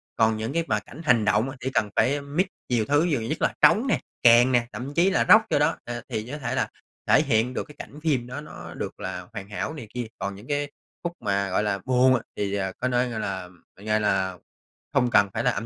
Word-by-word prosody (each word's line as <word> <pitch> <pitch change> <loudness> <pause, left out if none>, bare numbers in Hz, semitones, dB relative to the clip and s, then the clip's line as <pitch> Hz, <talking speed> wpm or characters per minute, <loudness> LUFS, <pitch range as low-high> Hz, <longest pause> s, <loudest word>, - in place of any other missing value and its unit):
Còn 110 -1 +3
những 110 +4 -3
cái 165 +1 +1
mà - - +1
cảnh 160 - -12
hành 115 -5 +4
động 105 +7 +2
á, 135 - -8
chỉ 130 - -2
cần 105 - +1
phải 140 +2 +2
mix 145 +6 0 0.2
nhiều 120 -3 +1
thứ, 145 +4 +3
nhiều 150 -8 +1
nhứt 115 +8 -3
là - - +2
trống 170 - +5
nè, 220 - +2 0.2
kèn 120 +2 +7
nè, 120 -2 +2
thậm 135 +3 -6
chí 175 +5 +4
là 115 -11 +2
Rock - - +8
vô - - +3
đó, - - +2
ờ, 120 0 -5
thì 110 -3 -3
nó - - -6
có - - -11
thể 130 -1 -3
là - - 0 0.4
thể - - +6
hiện 115 +3 +1
được - - -2
cái 150 - -15
cảnh 150 - -9
phim 135 -7 +1
đó 130 +4 -6
nó 85 - -10
được - - -6
là 90 -1 -5
hoàn 95 +1 -7
hảo 105 - -3
này 135 -9 -8
kia. 125 -2 -3
Còn 100 - -3
những 105 +5 -13
cái 145 0 -1 0.3
khúc 170 0 -2
mà, 100 -3 0
gọi 95 - +1
là, 100 -2 -1
buồn 130 0 +4
á 120 - -1 0.2
thì, 100 -1 -1
ờ, 95 -1 -1
có 125 - -1
nơi, 125 0 +1
gọi 115 -2 -4
là 95 -3 -4 0.3
gọi 105 +2 0
là 95 -3 0 0.6
không 125 -3 +3
cần 100 -3 +5
phải 115 +1 -1
là 125 - +3
âm 115 - -4
120 Hz, 265 wpm, -25 LUFS, 105-140 Hz, 0.6 s, Rock